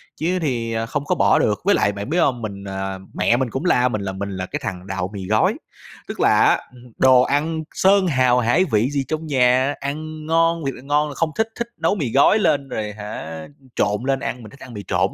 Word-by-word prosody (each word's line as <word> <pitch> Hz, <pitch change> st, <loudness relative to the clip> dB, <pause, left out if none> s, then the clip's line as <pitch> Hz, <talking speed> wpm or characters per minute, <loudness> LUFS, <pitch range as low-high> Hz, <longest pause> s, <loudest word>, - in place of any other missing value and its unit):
chứ 180 Hz, +4 st, -1 dB
thì, 120 Hz, -6 st, -2 dB
ờ, 115 Hz, 0 st, -1 dB
không 145 Hz, +4 st, -3 dB
có -, -, +1 dB
bỏ -, -, +3 dB
được. -, -, +1 dB
Với -, -, +4 dB
lại 100 Hz, -, +2 dB
bạn 100 Hz, +3 st, -6 dB
biết 165 Hz, -, 0 dB
hông, 125 Hz, -7 st, +1 dB
mình 100 Hz, -3 st, -6 dB
à, 95 Hz, -1 st, -4 dB
mẹ 120 Hz, -, +2 dB
mình 130 Hz, -1 st, -1 dB
cũng 135 Hz, +9 st, -4 dB
la 125 Hz, -8 st, +3 dB
mình 110 Hz, -4 st, -3 dB
là 100 Hz, -1 st, -3 dB
mình 100 Hz, +1 st, -5 dB
là 95 Hz, -, -3 dB
cái -, -, -5 dB
thằng 90 Hz, 0 st, -5 dB
đạo 95 Hz, -2 st, -3 dB
mì 95 Hz, -2 st, -6 dB
gói, 110 Hz, +2 st, +3 dB, 0.5 s
tức -, -, -7 dB
là -, -, +4 dB
á, -, -, +5 dB, 0.2 s
ừm 125 Hz, -1 st, -15 dB
hừm, 125 Hz, -, -16 dB
đồ 130 Hz, -1 st, +6 dB
ăn 155 Hz, +4 st, 0 dB
sơn 195 Hz, 0 st, +3 dB
hào 130 Hz, -5 st, +3 dB
hải 125 Hz, +10 st, +2 dB
vị 115 Hz, -, +1 dB
gì 140 Hz, -1 st, -1 dB
trong 155 Hz, 0 st, -3 dB
nhà, 130 Hz, 0 st, +3 dB
ăn 155 Hz, +2 st, -5 dB
ngon, 165 Hz, 0 st, +1 dB
thiệt 135 Hz, -, -2 dB
là -, -, -12 dB
ngon 145 Hz, +2 st, +1 dB
là -, -, -7 dB
không 165 Hz, -1 st, 0 dB
thích, 220 Hz, -, +1 dB
thích 235 Hz, -, -2 dB
nấu 165 Hz, +4 st, +1 dB
mì 140 Hz, -, -2 dB
gói 140 Hz, -, +5 dB
lên 145 Hz, -8 st, +1 dB
rồi 105 Hz, -1 st, -4 dB
hả 105 Hz, -6 st, -7 dB, 0.3 s
trộn 105 Hz, +2 st, 0 dB
lên 135 Hz, 0 st, +1 dB
ăn, 125 Hz, -1 st, -5 dB
mình 110 Hz, -, -10 dB
thích 140 Hz, -, -16 dB
ăn 125 Hz, -, -11 dB
mì 105 Hz, -2 st, -7 dB
trộn -, -, +1 dB
130 Hz, 255 wpm, -21 LUFS, 105-155 Hz, 0.5 s, đồ